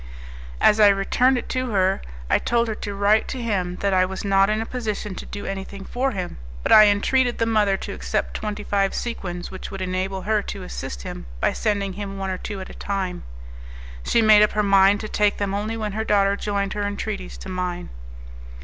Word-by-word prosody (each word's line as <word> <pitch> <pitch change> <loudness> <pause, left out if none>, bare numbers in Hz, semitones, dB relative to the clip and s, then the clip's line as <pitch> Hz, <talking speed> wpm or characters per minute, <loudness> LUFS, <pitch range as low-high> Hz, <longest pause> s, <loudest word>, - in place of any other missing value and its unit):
As 210 - +5
I 210 - +8
returned 205 +6 +3
it 240 - -4
to 255 -1 -1
her, 190 -2 +1 0.3
I - - +3
told 235 0 +1
her 220 - -1
to 205 -1 -6
write 205 +2 +3
to 260 - -4
him 190 -6 -1
that 200 -1 +1
I 185 0 +4
was 190 +2 -4
not 195 0 +4
in 215 0 +1
a 225 - -2
position 215 -4 -4
to - - -8
do 205 - -7
anything 195 0 -6
for 260 +2 -1
him, 185 - -5 0.2
but - - -1
I 215 -1 +9
entreated 240 +5 +2
the 230 - +1
mother 210 -3 +2
to - - -6
accept - - -2
twenty 210 -1 -4
five 195 -1 0
sequins, 180 -7 -4
which 190 - -7
would 195 - -7
enable 185 +1 -2
her 215 0 +1
to - - -6
assist - - -6
him - - -7
by - - +1
sending 200 -3 -1
him 195 0 -6
one 195 -1 -3
or 185 - -4
two 205 -2 -5
at 190 - -8
a - - -11
time. 190 -3 -3 0.8
She 230 - +2
made 215 -1 +7
up 210 - +4
her 210 - +1
mind 195 0 +5
to 215 - -5
take 210 -1 +1
them 200 -1 -2
only 215 +3 -2
when 215 -2 -3
her 220 +2 -2
daughter 200 -2 +3
joined 200 -1 -2
her 210 - -3
entreaties 60 - -5
to - - -9
mine. 180 -1 -3
200 Hz, 220 wpm, -23 LUFS, 190-215 Hz, 0.8 s, I